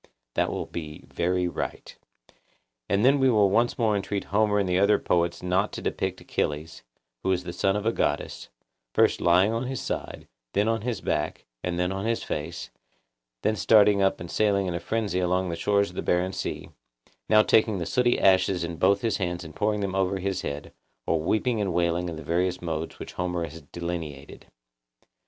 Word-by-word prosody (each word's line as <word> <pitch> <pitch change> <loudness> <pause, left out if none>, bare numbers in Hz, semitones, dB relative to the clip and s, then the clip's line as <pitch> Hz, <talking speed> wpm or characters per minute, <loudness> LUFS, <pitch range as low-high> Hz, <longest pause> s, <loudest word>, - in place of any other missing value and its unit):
That - - +1
will - - -3
be 75 -2 -7
very 90 +1 0
right. 85 - -5 0.9
Then 130 +8 +4
we 135 -1 +4
will 105 -5 +4
once 120 +4 +2
more 110 -3 +2
entreat 100 0 -2
Homer 105 0 +3
and 100 -2 +1
the 90 0 +2
other 100 +1 +5
poets 85 -2 0
not 95 +3 +1
to - - -5
depict - - -2
Achilles, 75 -1 -3 0.4
who 95 - 0
is 90 -1 0
the 85 -1 -6
son 95 +2 +1
of 105 +1 -2
a 115 - +3
goddess, - - -2 0.5
first - - +3
lying 90 +5 +4
on 115 +2 -2
his 130 -1 -3
side, - - -5 0.3
then 105 +2 +2
on 115 -1 +1
his 120 -2 -3
back, - - -2 0.2
and 90 -1 -2
then 90 +1 0
on 95 +3 -3
his 115 0 0
face; 85 +3 -5 0.7
then 110 - +2
starting 105 +1 +5
up 95 0 +2
and 85 - -7
sailing 100 -2 +2
in 90 - -2
a 85 - -2
frenzy 105 -4 -1
along 90 0 +1
the 85 - -2
shores 100 +3 +1
of - - -16
the - - -2
barren 90 +2 +1
sea; - - -5 0.6
now 110 0 +6
taking 110 -2 +3
the 85 - -3
sooty 120 +4 +2
ashes 95 -1 +3
in 85 0 -4
both 100 +3 +3
his 115 - 0
hands 90 -2 -2
and 80 -1 -10
pouring 105 0 0
them 100 -1 -2
over 95 0 +1
his 95 0 -2
head, 70 +1 -5 0.3
or 80 -1 +1
weeping 110 +6 +1
and 95 -4 -1
wailing 85 0 +1
in 85 - -5
the 80 - -8
various 90 +4 0
modes 80 -1 -4
which - - -8
Homer 90 -1 -2
has 80 +1 -10
delineated. 80 -3 -6
95 Hz, 195 wpm, -26 LUFS, 85-105 Hz, 0.9 s, now